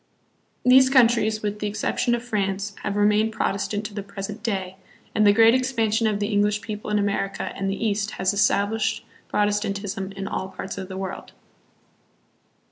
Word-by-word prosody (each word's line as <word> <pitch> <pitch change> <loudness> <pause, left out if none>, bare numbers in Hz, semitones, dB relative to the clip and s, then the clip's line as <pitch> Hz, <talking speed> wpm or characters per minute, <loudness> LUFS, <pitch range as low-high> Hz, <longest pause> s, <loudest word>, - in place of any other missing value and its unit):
These 260 +1 +7
countries, 230 -4 +3
with 210 0 -2
the 210 - -2
exception 220 +3 0
of 240 - -5
France, 200 -3 -2
have 205 - -3
remained 210 +2 +3
Protestant 205 +1 -2
to 210 - -6
the 205 - -4
present 200 +2 -7
day; 190 -5 -3 0.4
and 215 -1 +4
the - - +8
great 225 +2 +6
expansion 230 -4 +1
of 210 -2 0
the 205 0 -1
English 205 +1 +2
people 215 -2 -6
in 210 - +1
America 200 -1 -1
and 195 0 -2
the 195 - -1
East 210 0 0
has 190 +1 0
established 205 +1 +1 0.2
Protestantism 205 -1 -1
in 195 0 -5
all 190 - -3
parts 190 +1 -6
of 190 - -6
the 190 0 -7
world. 190 -1 -6
210 Hz, 170 wpm, -24 LUFS, 200-220 Hz, 0.4 s, the